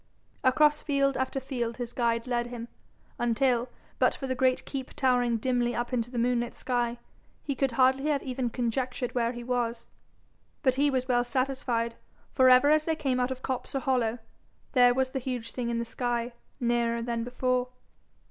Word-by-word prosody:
Across 300 +3 +4
field 275 -2 +1
after 260 +1 -1
field 245 -3 -3
his 240 -1 -5
guide 230 -1 0
led 240 -1 -1
him, 240 -1 -7 0.5
until, 240 +1 +1 0.3
but - - +3
for 270 - -6
the 260 - -1
great 255 0 +1
keep 265 -2 -6
towering 245 -3 +2
dimly 245 0 0
up 240 +2 -3
into 240 -1 0
the 245 - -6
moonlit 240 0 0
sky, 240 -1 -1 0.5
he 280 - -2
could 270 -1 0
hardly 265 +3 +3
have 285 -2 +1
even 255 -2 -2
conjectured 245 +1 -2
where 235 -1 +1
he 240 -1 -7
was. 235 -1 -2 0.7
But 260 -3 +4
he 285 +3 +2
was 260 -2 -1
well 245 -1 +3
satisfied, 245 -2 -1 0.4
for, 260 -1 +5
ever 255 +3 +6
as 310 0 +3
they 320 - +1
came 270 -5 0
out 250 0 +1
of 260 0 -6
copse 260 0 -3
or - - +2
hollow, 250 -4 +1 0.5
there 245 -2 +5
was 260 0 +1
the 265 - -2
huge 245 -3 -4
thing 245 -2 -3
in 235 - -1
the 235 - -2
sky, 240 0 -2 0.3
nearer 235 -1 +1
than 235 -1 -2
before. 250 +1 0
250 Hz, 185 wpm, -28 LUFS, 240-260 Hz, 0.7 s, ever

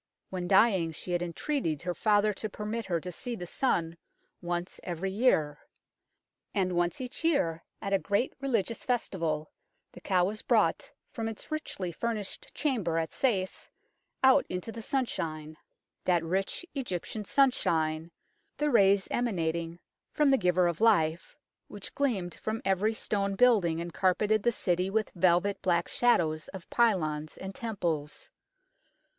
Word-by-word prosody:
When 180 -2 -3
dying 190 -5 +4
she 180 - -7
had 175 0 +1
entreated 175 - -2
her 180 -1 -1
father 210 +1 +3
to 215 +2 -5
permit 215 +2 -4
her 170 -3 0
to 180 +3 -6
see 240 +7 -4
the 180 - -6
sun 170 -6 0 0.5
once 175 0 -3
every 180 +2 -3
year. 160 - +2 1.0
And 185 -2 +1
once 175 -1 0
each 255 +4 -5
year, 175 - +1 0.2
at 200 - -2
a 195 - +4
great 205 +7 0
religious 230 -5 -1
festival, 165 -11 -1 0.4
the - - -13
cow 180 -2 +2
was 215 +3 -3
brought - - +2 0.2
from 225 -2 -3
its 225 +5 -7
richly 200 - -3
furnished 215 +2 -4
chamber 220 - 0
at 160 -1 -1
Sais 195 -8 -1 0.5
out 265 +1 +6
into 180 +5 -4
the 230 - -7
sunshine 165 - -2 0.5
that 175 -2 +3
rich 190 - -2
Egyptian 215 - -4
sunshine, 165 - +1 0.5
the 295 0 +1
rays 200 -4 +5
emanating 170 -7 -1 0.4
from 295 -2 +4
the 270 - +5
Giver 180 -2 +3
of 170 +1 -2
Life, 165 -7 +2 0.3
which 205 -1 -8
gleamed 210 -11 -1
from 220 +1 -4
every 195 +3 +2
stone 200 -2 -1
building 195 -9 +4
and 170 0 -5
carpeted 205 +3 +2
the 240 - +2
city 180 -3 0
with 215 +2 0
velvet 180 +2 +2
black 175 -2 +1
shadows 160 -10 +2
of 190 -3 -9
pylons 155 -10 +1
and 190 +1 -6
temples. 170 -10 -3
190 Hz, 145 wpm, -29 LUFS, 170-225 Hz, 1.0 s, out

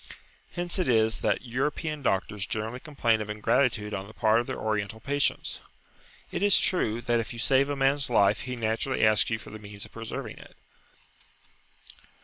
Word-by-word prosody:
Hence 175 +1 -2
it 180 - +1
is 110 -4 +3
that - - +1
European 145 +5 -2
doctors 100 -3 -1
generally 110 +3 -3
complain 120 -7 0
of 105 - -5
ingratitude 105 0 +1
on 95 0 -4
the 110 - -14
part 110 0 +3
of 120 - -3
their - - -4
Oriental 110 0 -2
patients. 140 +4 -1 0.7
It - - -3
is 205 -1 +6
true 120 - +1
that 120 -1 +1
if 115 +1 -4
you - - -9
save 135 +4 +3
a 145 - -1
man's 135 0 +1
life, 105 -3 +3
he 125 -1 -4
naturally 115 +2 0
asks 110 0 +3
you 110 - 0
for - - -12
the 110 - -8
means 105 -1 -7
of 105 - -16
preserving 115 -1 -6
it. - - -15
115 Hz, 180 wpm, -28 LUFS, 110-135 Hz, 0.7 s, is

